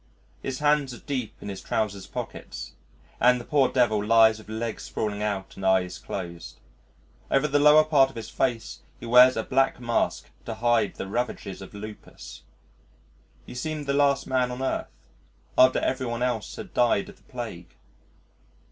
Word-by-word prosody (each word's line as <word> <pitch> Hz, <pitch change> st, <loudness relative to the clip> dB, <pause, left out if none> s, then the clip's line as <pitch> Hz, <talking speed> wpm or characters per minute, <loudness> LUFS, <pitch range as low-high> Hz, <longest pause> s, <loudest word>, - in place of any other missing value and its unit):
His 135 Hz, -1 st, -4 dB
hands 145 Hz, -3 st, +1 dB
are -, -, -12 dB
deep 130 Hz, -6 st, -4 dB
in -, -, -8 dB
his 95 Hz, -, -6 dB
trousers' 100 Hz, -3 st, -2 dB
pockets, -, -, -7 dB, 0.5 s
and 125 Hz, 0 st, +5 dB
the 120 Hz, -, -9 dB
poor 140 Hz, -4 st, +2 dB
devil 110 Hz, -5 st, +2 dB
lies 110 Hz, 0 st, +5 dB
with 110 Hz, -, -15 dB
legs 110 Hz, 0 st, -4 dB
sprawling 105 Hz, -1 st, -3 dB
out 100 Hz, -2 st, -3 dB
and 95 Hz, -, -9 dB
eyes 95 Hz, -1 st, +1 dB
closed: 85 Hz, -9 st, -7 dB, 0.7 s
over 135 Hz, +2 st, +2 dB
the 145 Hz, 0 st, +2 dB
lower 150 Hz, +1 st, +7 dB
part 145 Hz, -4 st, +4 dB
of -, -, -16 dB
his 115 Hz, -2 st, -6 dB
face 115 Hz, -3 st, -2 dB, 0.2 s
he -, -, -9 dB
wears 125 Hz, +2 st, +7 dB
a 110 Hz, -, 0 dB
black 135 Hz, +2 st, +1 dB
mask 120 Hz, -1 st, -1 dB
to 115 Hz, -, -4 dB
hide 115 Hz, -2 st, +1 dB
the -, -, -5 dB
ravages 100 Hz, -2 st, -4 dB
of 95 Hz, +2 st, -11 dB
lupus.... 105 Hz, +1 st, -10 dB, 1.0 s
He -, -, -10 dB
seemed 150 Hz, +4 st, -4 dB
the 140 Hz, -, 0 dB
last 140 Hz, -1 st, +2 dB
man 130 Hz, -1 st, +1 dB
on 125 Hz, +1 st, -5 dB
earth 130 Hz, -, -2 dB, 0.7 s
after 130 Hz, 0 st, +6 dB
every 130 Hz, -1 st, -1 dB
one 120 Hz, +1 st, -2 dB
else 120 Hz, -4 st, -2 dB
had -, -, -9 dB
died 125 Hz, +10 st, +2 dB
of 205 Hz, -, -13 dB
the -, -, -27 dB
plague. 110 Hz, -9 st, -7 dB
120 Hz, 175 wpm, -26 LUFS, 105-135 Hz, 1.0 s, lower